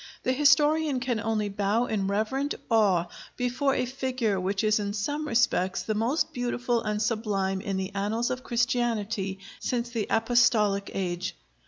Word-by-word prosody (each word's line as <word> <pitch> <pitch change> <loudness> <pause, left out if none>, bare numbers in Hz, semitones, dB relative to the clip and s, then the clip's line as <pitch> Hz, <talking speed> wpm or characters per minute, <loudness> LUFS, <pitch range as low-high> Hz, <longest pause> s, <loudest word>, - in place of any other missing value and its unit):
The - - +1
historian 295 +1 +4
can 245 -2 -1
only 215 -1 -1
bow 205 +4 0
in 205 -5 -1
reverent 220 +8 -1 0.2
awe 200 -6 +4 0.3
before 255 +2 0
a 250 - 0
figure 250 -5 -1
which 195 +3 -1
is 215 0 +3
in 205 -1 -2
some 290 +9 -2
respects 195 -6 +1
the 215 - -1
most 275 +9 0
beautiful 245 -1 -1
and 210 -1 -2
sublime 210 -4 -1
in 195 -1 -2
the 190 0 -3
annals 210 +4 -1
of 255 0 -4
Christianity 225 -5 -1 0.2
since 240 -1 -2
the 225 -4 -2
Apostolic 225 -3 +3
age. 180 -1 -2
225 Hz, 155 wpm, -27 LUFS, 200-250 Hz, 0.3 s, historian